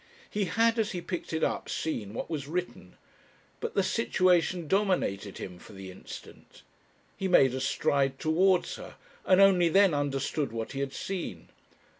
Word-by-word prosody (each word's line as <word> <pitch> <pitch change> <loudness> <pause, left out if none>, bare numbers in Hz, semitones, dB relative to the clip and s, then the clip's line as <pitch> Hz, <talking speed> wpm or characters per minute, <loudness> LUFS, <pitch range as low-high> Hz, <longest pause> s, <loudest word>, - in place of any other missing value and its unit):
He 205 -1 0
had 225 +6 +2
as 215 -3 0
he 180 - -2
picked 175 0 -5
it 160 0 -1
up - - -1
seen 110 -10 -3
what - - -4
was 145 -4 -4
written, 170 - -5 0.6
but - - -4
the - - +3
situation 175 +3 +2
dominated 180 - 0
him 90 -2 -7
for 105 - -14
the 95 -1 -9
instant. 90 - -12 0.5
He 195 - -2
made 135 -8 +5
a 130 - -3
stride 135 0 +1
towards 180 +5 +2
her, - - -10 0.3
and 185 0 +5
only 185 -3 +6
then 195 0 +5
understood 140 -1 -1
what 115 -1 -4
he 135 - -5
had 140 -1 -2
seen. 190 -3 -5
160 Hz, 165 wpm, -29 LUFS, 135-185 Hz, 0.6 s, only